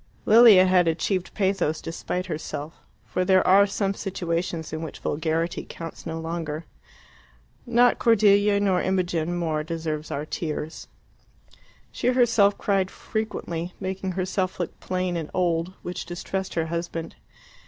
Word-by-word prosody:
Lilia 220 -4 +8
had 185 -2 +4
achieved 175 +3 0
pathos 190 -6 +1
despite 180 +2 -4
herself, 155 -2 -5 0.3
for 185 - -1
there 185 0 +4
are 200 +2 +6
some 195 0 -1
situations 170 -4 -3
in 160 - -3
which 160 -3 -6
vulgarity 160 +3 -1
counts 165 0 -8
no 165 0 -4
longer. 160 -1 -4 1.0
Not 240 +1 +4
Cordelia 205 -3 +4
nor 190 -3 +2
Imogen 175 -3 0
more 160 -3 -1
deserves 160 -1 -4
our 145 +2 -3
tears. 155 0 -5 1.0
She - - -3
herself 230 -5 +4
cried 195 -2 +1
frequently, 180 -7 -4
making 190 0 -3
herself 185 0 -2
look 175 - -4
plain 185 -1 -2
and 160 -3 -4
old, 175 0 0
which 175 - -5
distressed 190 +2 -4
her 165 -1 +1
husband. 165 0 -4
180 Hz, 130 wpm, -25 LUFS, 165-195 Hz, 1.0 s, Lilia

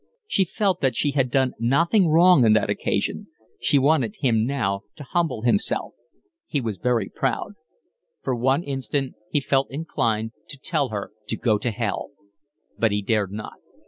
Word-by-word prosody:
She 195 - +1
felt 195 +2 0
that 135 -3 +1
she 145 - +1
had 135 -3 +1
done 130 0 +2
nothing 165 - +3
wrong 170 -2 +6
on 110 -2 +5
that 110 - +2
occasion. - - -1 0.3
She 145 - +2
wanted 135 -6 +2
him 115 -4 +2
now 100 -8 -1
to 150 - -9
humble 145 -6 -1
himself. 125 - +1 0.5
He 145 - -1
was 110 -7 -4
very 120 -4 +1
proud. - - -2 0.7
For 130 - 0
one 130 +6 +1
instant 135 -1 -2 0.2
he 145 - +1
felt 135 0 +1
inclined 115 -7 -1 0.2
to 145 - -7
tell 145 -2 -1
her 105 -2 -5 0.2
to - - -2
go 110 -4 +1
to 125 - -1
hell, 110 -1 -3 0.7
but 115 -2 +3
he 105 0 -1
dared 105 -2 0
not. 105 +1 -7
130 Hz, 170 wpm, -24 LUFS, 110-145 Hz, 0.7 s, wrong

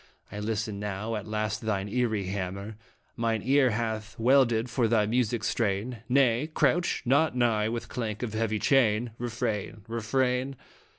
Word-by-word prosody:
I 105 - -5
listen 105 -1 -2
now; 105 +2 -3
at 105 -1 -5
last 105 -1 -2
thine 105 -3 -1
eerie 110 -2 0
hammer 100 +2 -4 0.4
Mine 115 -2 -1
ear 135 0 +4
hath 110 0 -3
welded 120 -1 +3
for 120 0 +1
thy 110 -2 +3
mystic 120 0 0
strain 110 +3 -1
Nay, 130 +2 +3
crouch 175 +2 +1
not 140 +2 +3
nigh 110 -3 +2
with 115 0 -4
clank 115 -2 -4
of 110 -3 -3
heavy 110 -1 0
chain. 115 0 +2
Refrain! 110 -3 -3
Refrain 125 +4 0
115 Hz, 145 wpm, -28 LUFS, 105-125 Hz, 0.4 s, ear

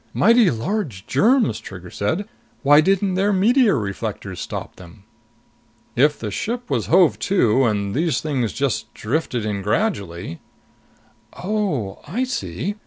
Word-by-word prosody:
"Mighty 230 -1 +5
large 120 - -3
germs!" 230 - +2
Trigger 90 -2 -10
said. 160 - -2 0.4
"Why 145 +2 +7
didn't 195 +2 +1
their 195 +3 +2
meteor 215 - +4
reflectors 100 -3 -4
stop - - -6
them?" 90 +2 -14 0.9
"If 145 +4 +3
the 105 -2 -5
ship 235 - -4
was 120 -5 0
hove 175 -1 +4
to 130 - +3
and 100 -3 0
these 160 +3 +1
things 135 -8 -1
just 115 -6 -2
drifted 125 -1 -2
in 105 -2 -2
gradually 95 - -2 0.5
" - - -33
"Oh, 180 - -1
I 220 - -1
see. 250 -6 -3
145 Hz, 135 wpm, -21 LUFS, -, 0.9 s, Why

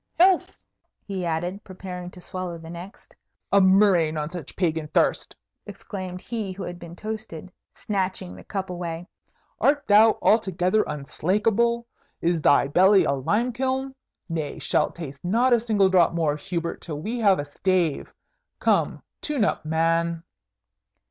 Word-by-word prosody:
"Health!" 370 0 +4 0.5
he 190 -3 -3
added, 175 +5 -2
preparing 180 -1 -7
to 180 - -13
swallow 185 -2 -5
the 165 0 -10
next. 175 +4 -11 0.4
"A 200 - +6
murrain 190 -5 +4
on 150 +1 -3
such 175 -6 -8
pagan 160 -4 -1
thirst!" - - +1 0.3
exclaimed 185 -3 -7
he 215 -5 -4
who 190 +1 -7
had 175 0 -6
been 170 0 -10
toasted, 215 -5 -6 0.2
snatching 185 - -3
the 90 - -12
cup 190 -2 -4
away. 175 -1 -5 0.5
"Art 290 0 +2
thou 215 +2 +6
altogether 190 -1 +2
unslakable? 210 +11 0 0.3
Is 170 -1 0
thy 145 -1 +4
belly 190 +6 +5
a - - +1
lime 210 - 0
kiln? 265 +2 -1 0.3
Nay, 160 -3 -3
shalt - - 0
taste 145 -5 -8
not 235 +8 +3
a 240 - +5
single 215 -4 +2
drop 180 -3 +4
more, 160 -3 +1
Hubert, 170 +1 -4
till 150 -3 -5
we 225 +9 -3
have 200 -4 +4
a 145 - -3
stave. 170 +1 0 0.5
Come, - - +1 0.2
tune 285 -8 0
up, - - -2
man!" 165 +1 +1
185 Hz, 150 wpm, -25 LUFS, 165-210 Hz, 0.5 s, A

